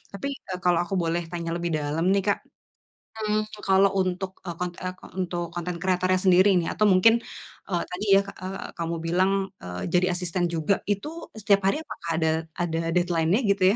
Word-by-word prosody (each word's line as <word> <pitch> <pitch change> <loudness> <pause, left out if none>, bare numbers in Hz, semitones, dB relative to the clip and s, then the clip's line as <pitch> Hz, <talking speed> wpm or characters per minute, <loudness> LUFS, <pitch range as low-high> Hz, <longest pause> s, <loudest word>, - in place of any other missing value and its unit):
tapi, 200 - -4 0.2
eee, 180 -1 -3
kalau 175 -1 +3
aku 190 +3 -3
boleh 170 +1 0
tanya 170 -1 -3
lebih 170 0 -2
dalam 150 +4 -1
nih 200 -1 +2
Kak, 205 - +2 0.8
mmm, 215 0 +1 0.3
kalau 195 +1 +6
untuk, 185 +1 -2
eee, 175 - -3
kon 180 -1 -1
eee, 185 0 -4 0.3
untuk 175 -1 -1
konten 175 0 -3
kreatornya 185 0 +2
sendiri 185 +2 +6
nih 165 - -2
atau 215 - 0
mungkin, 225 +5 +6 0.6
eee, 175 - +1
tadi 190 +4 -4
ya, 195 - +6 0.2
eee, 190 +1 -5
kamu 170 0 -2
bilang, 185 +3 +2 0.3
eee, 90 0 -6
jadi 180 +1 +4
asisten 180 0 -2
juga 160 +5 +2 0.2
itu 205 +9 -2 0.3
setiap 200 -1 +3
hari 195 - +2
apakah 170 - -8
ada 160 0 +2 0.3
ada 165 -1 -1 0.2
deadline-nya 175 +3 +2
gitu 195 -2 +1
180 Hz, 180 wpm, -26 LUFS, 170-195 Hz, 0.8 s, kalau